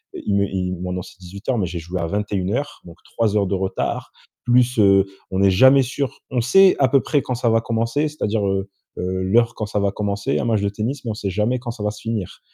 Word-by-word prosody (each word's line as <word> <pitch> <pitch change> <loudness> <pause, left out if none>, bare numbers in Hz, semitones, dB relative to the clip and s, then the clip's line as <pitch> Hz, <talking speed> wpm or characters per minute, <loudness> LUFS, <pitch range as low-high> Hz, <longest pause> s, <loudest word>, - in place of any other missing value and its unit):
heu, - - -5
il 100 - +1
me 100 0 +3
il 95 -1 -2
m 90 - -7
maintenant 90 0 -3
c'est 100 - -15
18:00 100 +6 -4
mais 90 - 0
j'ai 85 0 -5
joué 85 +3 -5
à 85 - -2
21:00 105 - -2
donc 85 -1 -12
3 110 -2 -1
heures 100 - +2
de 100 - -2
retard 95 0 -2 0.3
plus, 125 0 +3
heu, 95 -2 +6 0.3
on 95 - -2
n'est 100 0 +5
jamais 130 +8 +6
sûr, 130 0 -4
on 125 - 0
sait 185 +11 +5
à 135 - +5
peu 135 +2 +3
près 145 +5 +1
quand 125 - -3
ça 115 -1 0
va 115 0 +3
commencer, 115 +6 -1
c'est-à-dire, 110 -9 -1
heu 95 0 -1 0.3
heu, 95 +1 -2
l'heure 115 +5 +3
quand 110 - -3
ça 105 0 -2
va 100 - +1
commencer 100 +5 -2
un - - -2
match 110 -3 +1
de 100 - 0
tennis, 115 +7 -4
mais 115 - -3
on - - -3
sait 105 -2 -4
jamais 105 +6 0
quand 120 -1 -5
ça 115 -3 -7
va 105 - 0
se 105 - -11
finir. 110 -5 -4
105 Hz, 260 wpm, -21 LUFS, 95-120 Hz, 0.3 s, heu